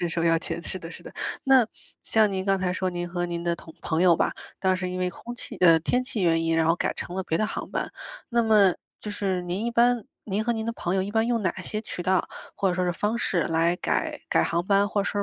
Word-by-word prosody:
身 175 - 0
手 165 0 -1
钥 165 -1 +3
钱， 170 - -2
是 185 - -2
的 165 -1 -9
是 - - -10
的。 - - -11 0.3
那 265 -4 +5 0.4
像 215 -2 +4
您 190 -1 -2
刚 195 0 +2
才 185 -1 -1
说， 185 0 -1
您 175 0 -4
和 175 0 -2
您 170 0 -4
的 170 -1 0
同 160 - -13
朋 160 +2 0
友 175 -2 +6
吧， - - +1 0.3
当 185 -1 +2
时 - - -6
是 180 - -3
因 185 - -4
为 180 - 0
空 240 +7 -9
气 - - -3
呃， 165 -3 +6
天 250 +9 0
气 220 -5 0
原 165 -2 +3
因， 165 0 +1
然 160 0 +2
后 165 +1 +3
改 - - -1
成 180 - -6
了 190 - -1
别 165 -3 -1
的 215 - +1
航 - - -5
班， - - -2 0.4
那 235 -2 +2
么 210 -5 +5 0.3
就 210 - -5
是 190 -3 0
您 180 +5 -3
一 235 - 0
般 240 -1 +3 0.2
您 210 +1 -1
和 235 - +1
您 220 0 -3
的 230 - -1
朋 185 -4 -2
友 190 - +2
一 200 - -4
般 220 0 +2
用 235 -2 +1
哪 185 - +1
些 215 +4 -2
渠 180 -5 -5
道 185 0 +1 0.3
或 195 - +1
者 180 - 0
说 180 0 0
是 175 - +1
方 210 +6 -1
式 175 -7 +1
来 165 +1 +1
改 - - -1
改 - - +3
航 170 +1 -1
班， 200 0 +4
或 205 - 0
者 - - -5
说 205 0 -1
185 Hz, 305 characters per minute, -25 LUFS, 175-215 Hz, 0.4 s, 友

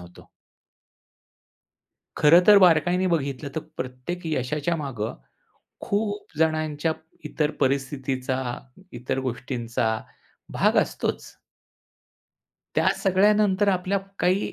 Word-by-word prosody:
होतो. 90 0 -15 1.9
खरं 165 +4 +7
तर 205 -1 +9
बारकाईने 180 +1 +4
बघितलं 140 -3 -2
तर 160 - -1 0.2
प्रत्येक 130 +8 -5
यशाच्या 150 +2 -1
मागं 130 -8 -4 0.7
खूप 205 -5 -3
जणांच्या 155 0 0 0.3
इतर 150 -1 -1
परिस्थितीचा, 135 -1 -1 0.5
इतर 130 +2 -3
गोष्टींचा 120 -3 -2 0.6
भाग - - +2
असतोच. - - -3 1.5
त्या - - +3
सगळ्यानंतर 205 +1 +3
आपल्या 185 +1 +1 0.2
काही 185 +3 +1
155 Hz, 85 wpm, -24 LUFS, 130-180 Hz, 1.9 s, तर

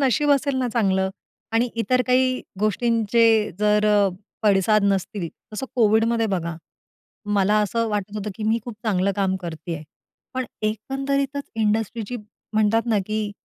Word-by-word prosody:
नशीब 290 +2 +2
असेल 280 -1 +2
ना, 255 -1 0
चांगलं 190 -4 +1 0.4
आणि 230 +2 +2
इतर 250 +4 +2
काही 255 0 +3 0.2
गोष्टींचे 225 0 +3
जर 210 0 +3
अ, 205 -1 +4 0.3
पडसाद 210 +1 +4
नसतील, 195 -2 0 0.2
तसं 240 +5 -4
कोविडमध्ये 225 0 +3
बघा, 170 -5 -2 0.8
मला 205 +1 +3
असं 230 +3 0
वाटत 205 -1 -3
होतं 210 0 -3
की 215 - -7
मी 220 +2 +2
खूप 240 - -6
चांगलं 200 -2 +1
काम 190 -2 +1
करते 170 -1 -5
आहे. 155 -1 -7 0.5
पण 260 0 -1 0.2
एकंदरीतच 275 +6 -1
इंडस्ट्रीची 220 +1 -1 0.4
म्हणतात 215 +1 +3
ना, 220 -3 +2
की 215 -1 -2
215 Hz, 145 wpm, -23 LUFS, 200-235 Hz, 0.8 s, अ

